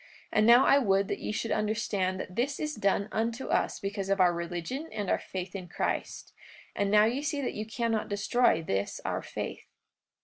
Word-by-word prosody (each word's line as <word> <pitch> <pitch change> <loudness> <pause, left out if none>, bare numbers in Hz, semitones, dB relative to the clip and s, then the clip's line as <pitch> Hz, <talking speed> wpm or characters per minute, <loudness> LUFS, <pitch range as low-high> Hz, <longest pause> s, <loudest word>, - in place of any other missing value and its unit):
And 215 +1 +3
now 240 +3 +8
I 280 - +6
would 195 -5 +2
that - - -2
ye - - -3
should 225 +1 -2
understand 210 -3 0
that 180 - -6
this 275 +4 -1
is 300 -1 -2
done 200 -3 +1
unto 230 +3 -2
us - - +1
because 195 -1 -4
of 195 0 +2
our 180 -1 +5
religion 175 - -4
and 205 -3 -2
our - - +2
faith 185 0 -6
in 185 -2 -6
Christ. 175 - -3 0.4
And 200 0 0
now 210 +1 +6
ye 245 +5 0
see 290 0 -2
that 270 - -2
ye 215 - -4
cannot 225 -1 -1
destroy 205 -2 +2
this 100 -8 -2
our - - -1
faith. - - -6
210 Hz, 200 wpm, -29 LUFS, 190-235 Hz, 0.4 s, now